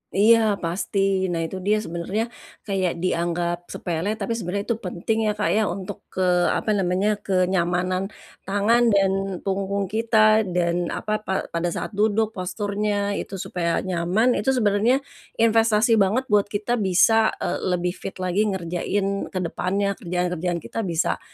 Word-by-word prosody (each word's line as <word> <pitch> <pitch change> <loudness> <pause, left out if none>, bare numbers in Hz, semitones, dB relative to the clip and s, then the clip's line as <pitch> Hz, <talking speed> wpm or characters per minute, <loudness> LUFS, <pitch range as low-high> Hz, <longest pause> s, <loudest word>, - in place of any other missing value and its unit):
Iya, 225 +3 +6 0.2
pasti, 190 +2 0
nah, 170 -2 -1
itu 175 +3 -5
dia 210 +3 +1
sebenarnya, 200 +7 -3 0.3
kayak 190 -3 -1
dianggap 175 0 -1
sepele 175 +5 -3
tapi 215 0 -4
sebenarnya 200 0 -3
itu 225 - -1
penting 180 +5 -2
ya, - - +3
Kak, 210 - 0
ya, 220 - +3
untuk 185 +1 -6
ke 185 - -2 0.2
apa 215 - 0
namanya 195 +1 +1
kenyamanan, 185 0 0 0.4
tangan 215 +5 +3
dan 200 -3 +3 0.3
punggung 195 +1 -1
kita 220 -1 +4
dan 175 -1 0
apa 215 0 -2
pa 190 - 0 0.2
pada 170 +1 -1
saat - - -4
duduk 215 +1 +1
posturnya 205 +1 -2
itu 195 - -6
supaya 175 -2 -2
nyaman 185 +6 +1
itu 265 0 +1
sebenarnya, 230 +4 +2 0.4
investasi 225 0 +4
banget 205 +6 +2
buat 205 -1 +4
kita 215 +4 -1
bisa, 220 +3 +4 0.2
eee, - - -1 0.2
lebih 180 0 -1
fit 190 +1 -8
lagi 185 +3 0
ngerjain 195 +2 -2
ke 185 - -4
depannya 195 +4 -1
kerjaan 180 0 -2
kerjaan 175 0 -1
kita 225 -3 -4
bisa 170 -1 0
195 Hz, 150 wpm, -23 LUFS, 180-215 Hz, 0.4 s, Iya